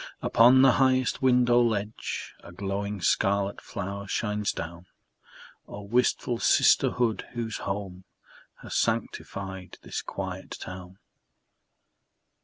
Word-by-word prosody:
Upon 125 +3 +6
the 135 - +7
highest 130 -1 +2
window 125 -2 +4
ledge 110 -2 -2
A - - -11
glowing 100 +2 -4
scarlet 100 +2 +1
flower 100 +2 -6
shines 105 0 -1
down. 85 +2 -7 0.8
Oh, 105 - -8
wistful 120 +2 0
sisterhood, 120 -3 +3
whose 115 -2 -3
home 95 -2 -5 0.6
Has - - -7
sanctified 95 -2 -3
this - - -4
quiet - - -6
town! 90 0 -9
105 Hz, 100 wpm, -27 LUFS, 95-120 Hz, 0.8 s, the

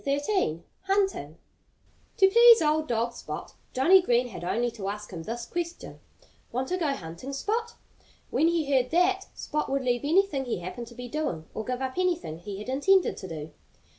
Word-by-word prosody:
XIII 280 - 0 0.2
HUNTING 390 0 0 0.8
To 385 - +7
please 470 +3 +8
old 310 0 +1
dog 235 -1 0
Spot - - -7 0.2
Johnnie 355 +9 +6
Green 245 -6 +2
had 200 - -8
only 235 +7 0
to 210 -4 -6
ask 210 0 -6
him 170 - -5
this 230 +6 -5
question, 345 +4 -5 0.5
"Want 255 +2 -2
to 365 - 0
go 335 -4 0
hunting, 170 +9 -8
Spot?" 455 +10 -2 0.6
When 320 - +3
he 335 -2 +1
heard 255 -2 +3
that, 370 +3 +2
Spot 300 0 -2
would 275 0 0
leave 245 -1 +1
anything 310 -3 +2
he 245 - -2
happened 185 +7 -6
to 235 - -13
be 245 +1 -7
doing, 240 - -3
or 220 - -4
give 250 +3 -3
up 260 +6 -3
anything 345 - -1
he 195 +3 -7
had 210 - -8
intended 350 +9 +3
to 190 - -7
do. 155 -2 -7
265 Hz, 185 wpm, -27 LUFS, 230-355 Hz, 0.8 s, please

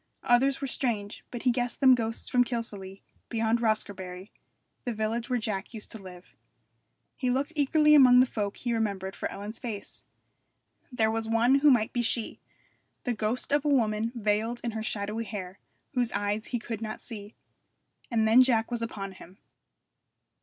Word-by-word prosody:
Others 265 +3 +3
were - - -1
strange, 220 -6 -2
but 240 - -6
he 255 - +4
guessed 245 0 -2
them 265 -2 +7
ghosts 230 -2 -1
from 250 0 +4
Kilsallagh, 205 -6 -5 0.3
beyond 225 0 +1
Roscarbery, 195 -4 -2 0.5
the 240 -2 -3
village 225 +3 -2
where 250 - +2
Jack 215 -1 -3
used 215 - -7
to 225 - -7
live. 180 -1 -12 0.8
He 255 - -1
looked 275 +5 0
eagerly 300 +1 +4
among 255 -4 +8
the 255 - +7
folk 205 -5 -3
he 240 -1 -2
remembered 200 -4 -2
for - - -3
Ellen's 205 +3 -6
face. 215 -5 -6 0.9
There 220 -3 +2
was 225 0 -2
one 240 +4 +4
who 295 +1 +6
might 235 -5 +3
be 240 - +1
she, 230 -1 -1 0.6
the 245 - 0
ghost 220 +5 -2
of 290 0 +3
a - - -1
woman 225 -4 +2
veiled 220 +2 0
in 235 - -1
her 220 0 -4
shadowy 215 +1 -3
hair, 195 -3 -7 0.3
whose 245 -3 +1
eyes 205 +2 -1
he 245 - -1
could 225 -1 -5
not 215 -1 -4
see. 210 -3 -9 0.7
And 225 -2 +2
then 230 +4 +7
Jack 240 -3 +2
was 240 -1 -2
upon 200 -4 -4
him. 185 0 -14
225 Hz, 175 wpm, -28 LUFS, 210-245 Hz, 0.9 s, among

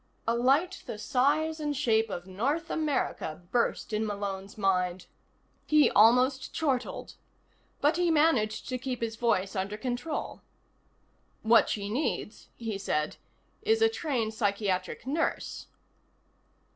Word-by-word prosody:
A 230 - +3
light 280 +10 +2
the - - -5
size 295 +7 +1
and 295 -2 -2
shape 225 -5 +2
of 175 -3 -5
North 270 - -2
America 270 - -2
burst 235 -2 0
in 215 +1 +1
Malone's 200 -2 -4
mind. 180 -2 0 0.6
He 305 -1 +5
almost 250 +5 +4
chortled. 270 -6 -2 0.7
But 295 +4 +3
he 355 -1 +2
managed 295 -9 +2
to 255 -1 -2
keep 250 -1 -4
his 225 -1 -3
voice 210 -4 0
under 200 +2 -2
control. 250 +7 -4 1.0
"What 225 +1 +5
she 200 -1 -2
needs," 230 -1 -3
he 225 -4 -4
said, 150 -5 -1 0.4
"is 440 +1 +2
a 450 0 +5
trained 255 - -2
psychiatric 200 -5 -1
nurse." 305 +5 -2
235 Hz, 125 wpm, -29 LUFS, 205-295 Hz, 1.0 s, He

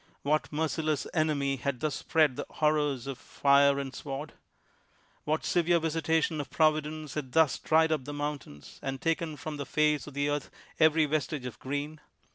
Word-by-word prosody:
AYhat 155 +2 +1
merciless 155 -1 -1
enemy 145 -4 +1
had 130 0 -2
thus 155 +1 -1
spread 155 -5 +2
the - - -5
horrors 150 -4 +1
of 135 -2 -5
fire 140 0 +3
and 135 -1 -4
sword 145 +1 -5
1 - - -22 0.9
What 155 +1 0
severe 175 0 +3
visitation 160 -1 0
of 145 - -9
Providence 155 -1 +1
had 135 -4 -5
thus 160 -5 +4
dried 160 0 +3
up 150 -5 0
the 145 - -5
mountains, 145 - -6
and 135 0 -4
taken 165 0 -1
from 155 0 -6
the 140 - -4
face 150 -1 +1
of 145 - -10
the 145 0 0
earth 145 0 -2 0.3
every 155 0 +5
vestige 150 -2 -2
of 120 -3 -7
green? 145 +3 -4
150 Hz, 175 wpm, -29 LUFS, 140-155 Hz, 0.9 s, every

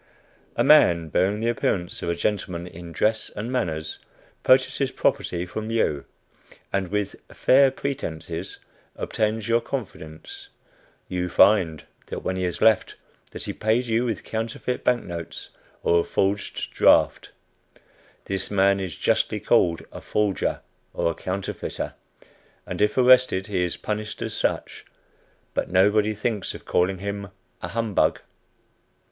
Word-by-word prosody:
A - - +2
man, 85 -2 +5
bearing 100 +6 +1
the 115 - +1
appearance 90 -6 -1
of - - -2
a 85 - 0
gentleman 90 -2 -2
in 85 -1 -10
dress 110 +6 +1
and 115 +4 -4
manners, 80 -11 -2 0.4
purchases 130 +1 +3
property 85 0 0
from 110 +4 -5
you, 75 -11 0 0.7
and 95 -1 0
with 105 +2 -2 0.2
"fair 135 +1 +5
pretences" 90 - -4 0.4
obtains 110 -1 -1
your 115 0 +3
confidence. 125 - -7 0.6
You 90 -1 -2
find, 95 -5 +4 0.3
when 95 - -3
he 95 0 -1
has 90 - -3
left, 110 -2 +4 0.3
that - - -7
he - - -3
paid 110 +3 +1
you 115 0 +1
with 115 -5 -2
counterfeit 115 +3 -3
bank 125 -1 +2
notes, 85 -2 -7 0.3
or 85 - +4
a - - +1
forged 100 +1 -1
draft. - - +4 1.0
This 95 -1 -2
man 100 0 +3
is 95 -4 -4
justly - - +1
called 85 -2 +2
a - - -9
"forger," 105 -2 0 0.3
or 85 - +1
"counterfeiter;" 95 +3 -4 0.7
and - - -5
if 105 +3 +2
arrested, 125 -6 +5
he 95 -4 -1
is 90 - -2
punished 105 0 -4
as - - -4
such; - - -2 0.7
but - - -1
nobody 105 +3 +3
thinks 105 -1 -2
of - - -11
calling 95 +2 +1
him 100 +1 -4 0.3
a - - -3
"humbug." 105 -9 +1
100 Hz, 135 wpm, -24 LUFS, 90-115 Hz, 1.0 s, man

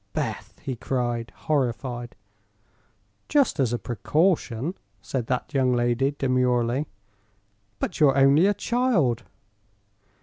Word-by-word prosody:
"Beth!" - - -4
he 130 - -3
cried, 120 -1 -2
horrified. 120 -4 -1 1.1
"Just 280 - +2
as 130 -4 +2
a 120 - 0
precaution," 145 - 0 0.3
said 120 +4 -4
that 130 +3 -2
young 130 -2 +2
lady, 120 +4 +1
demurely. 125 +1 +1 0.9
"But 175 - -3
you're 140 -3 +5
only 140 +7 +5
a 205 - +2
child!" 200 - +1
130 Hz, 105 wpm, -25 LUFS, 120-150 Hz, 1.1 s, you're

